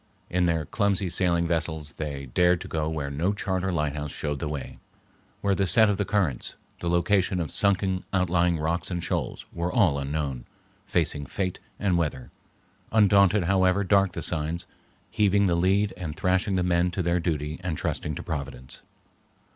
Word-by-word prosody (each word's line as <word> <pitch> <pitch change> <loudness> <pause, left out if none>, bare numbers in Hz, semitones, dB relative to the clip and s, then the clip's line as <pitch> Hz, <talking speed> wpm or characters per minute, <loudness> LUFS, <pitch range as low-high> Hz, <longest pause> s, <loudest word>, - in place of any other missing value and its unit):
In 90 0 +2
their 80 -2 0
clumsy 100 +1 0
sailing 85 -1 +3
vessels 80 -3 -2
they 70 -3 -5
dared 90 +7 +3
to - - -7
go 80 -1 -1
where 75 -3 -3
no 85 +8 0
chart 95 -2 -2
or 95 - 0
lighthouse 75 -2 -2
showed 75 -2 -3
the 80 - -3
way, 75 -3 -6 0.6
where 100 -1 +2
the 95 0 +1
set 110 +1 +5
of 100 - -1
the 100 - 0
currents, 90 -10 -1 0.2
the 85 - -2
location 90 +2 +2
of 80 -5 -3
sunken 95 -2 +1
outlying 90 -2 +2
rocks 80 +3 -1
and 90 -2 -3
shoals, 85 -6 -2
were 85 +1 -2
all 90 -10 +3
unknown, 70 -3 -3 0.4
facing 75 -4 -1
fate 90 +2 -3 0.2
and 95 -4 +2
weather, 65 -7 -3 0.6
undaunted 100 -2 +5
however 95 +2 +3
dark 95 -1 +3
the 85 - -4
signs, 80 +1 +1 0.5
heaving 100 -1 +3
the 90 - +2
lead 95 +4 +2
and 80 -3 -6
thrashing 95 +1 +1
the 90 - +1
men 90 0 +2
to 90 +1 -2
their 85 +1 +1
duty 75 -2 -2
and 85 -4 -2
trusting 75 - -2
to - - -6
Providence. 70 -6 -5
85 Hz, 175 wpm, -26 LUFS, 75-95 Hz, 0.6 s, set